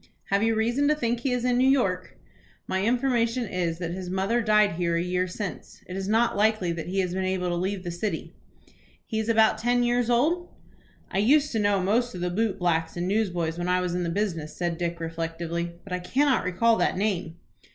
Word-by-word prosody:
"Have 200 0 +3
you 225 0 +2
reason 240 +6 +1
to 300 - +3
think 240 -4 -1
he 255 +2 -1
is 250 0 -1
in 250 0 +2
New 260 +1 +4
York?" 195 -10 0 0.5
"My 190 0 -1
information 240 0 +1
is, 170 -3 -2
that 170 -1 -4
his 180 0 -5
mother 195 +6 0
died 215 -2 +4
here 170 0 -1
a 170 - +1
year 180 +1 0
since. 180 - -7
It 180 - -7
is 195 0 -3
not 225 +3 +2
likely 210 -4 +2
that 170 -1 -5
he 190 +2 0
has 180 -1 -2
been 190 0 -1
able 185 -1 -1
to - - -1
leave 185 +2 -2
the 175 - -4
city." 185 +5 -4 0.7
"He 220 -3 -2
is 220 +1 -2
about 220 -1 +4
ten 245 +2 +2
years 240 0 +1
old?" 320 +9 +2 0.6
"I 190 - 0
used 285 +8 +4
to 225 - 0
know 205 -2 +2
most 235 +4 +1
of 180 - -6
the 180 0 -1
boot 210 +1 0
blacks 165 -2 0
and 175 +1 -1
newsboys 175 -5 -1
when 175 - -2
I 180 0 +2
was 180 -1 -2
in 180 - -1
the 170 - -1
business," 165 -5 -2
said 175 -2 -2
Dick, 170 -1 -2
reflectively; 165 +1 -3
"but 195 - -7
I 180 - -1
cannot 265 +9 +1
recall 225 +6 +3
that - - +1
name." 185 -5 -1
195 Hz, 225 wpm, -26 LUFS, 175-230 Hz, 0.7 s, New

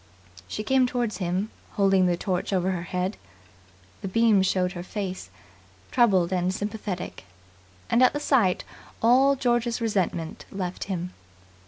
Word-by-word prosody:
She 215 - -4
came 260 +2 +3
towards 240 -3 -2
him, 185 +3 -2 0.2
holding 195 -2 +3
the 175 -1 +1
torch 180 0 -2
over 190 -1 +1
her 180 -2 -2
head. 180 +3 -2 0.8
The - - -4
beam 220 0 +4
showed 185 -1 +1
her 175 - -6
face, 185 - -5 0.6
troubled 190 -8 +3
and 180 0 +1
sympathetic, 205 - -5 0.6
and 235 - +3
at 255 - +6
the 290 - -3
sight 235 -11 +2 0.4
all 265 +4 +5
George's 240 -2 0
resentment 185 -7 -2
left 185 -2 -4
him. 180 -2 -4
195 Hz, 140 wpm, -26 LUFS, 180-230 Hz, 0.8 s, at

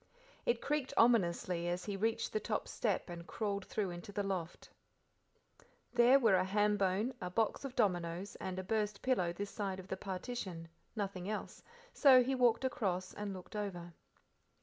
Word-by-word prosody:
It 235 0 +2
creaked 285 -2 -1
ominously 180 -6 +3
as 175 +1 -2
he 205 - -3
reached 220 +3 -1
the 215 - +1
top 215 -1 -2
step 210 -5 -1
and 170 0 -8
crawled 200 -3 -2
through 200 -4 -2
into 175 +3 -8
the 205 0 -1
loft. 185 -4 -4 1.3
There 245 +2 +7
were 230 -7 +4
a 185 - +3
ham 210 +2 +2
bone, 200 +5 +1
a 180 - -3
box 220 +8 0
of 265 -2 -6
dominoes, 180 -4 0
and 185 -1 -4
a 190 - -3
burst 210 0 -1
pillow 235 -10 +2
this 200 +3 -5
side 195 -3 -3
of 190 - -10
the 190 - -2
partition, 185 -3 -5 0.3
nothing 195 -3 -3
else, 215 - -5 0.3
so 260 -3 +7
he 265 +2 0
walked 245 -1 +3
across 185 -7 -1
and 205 -1 -4
looked 185 +2 -9
over. 175 -5 -4
200 Hz, 170 wpm, -35 LUFS, 185-225 Hz, 1.3 s, There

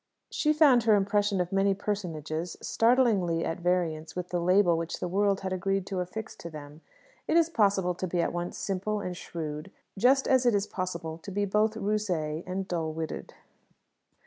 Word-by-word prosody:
She 305 - +2
found 295 -5 +5
her 220 -2 +6
impression 205 0 +1
of 180 -1 -1
many 195 0 +2
personages 170 -5 -4
startlingly 225 -9 +2
at 165 - -3
variance 170 -3 -1
with 180 0 -4
the 175 - -1
label 180 0 +4
which 165 0 -3
the - - -2
world 200 +2 +1
had 190 -1 -3
agreed 195 +1 -1
to 195 -1 -3
affix 220 +5 -5
to 170 - -8
them. 150 0 -10 0.5
It - - +3
is 335 0 +3
possible 195 - +2
to 185 +1 -4
be 175 0 -1
at 170 - 0
once 175 0 -4
simple 200 +2 -2
and 180 -3 -4
shrewd, 155 -1 -6 0.3
just 265 +4 +4
as 260 -1 +4
it 235 - +4
is 200 0 +1
possible 170 -4 -4
to 185 - -9
be 205 +1 0
both 210 +2 +1
rusé 185 -7 -1
and 190 +1 -3
dull 165 -3 -2
witted. 160 0 -5
185 Hz, 185 wpm, -28 LUFS, 170-205 Hz, 0.5 s, her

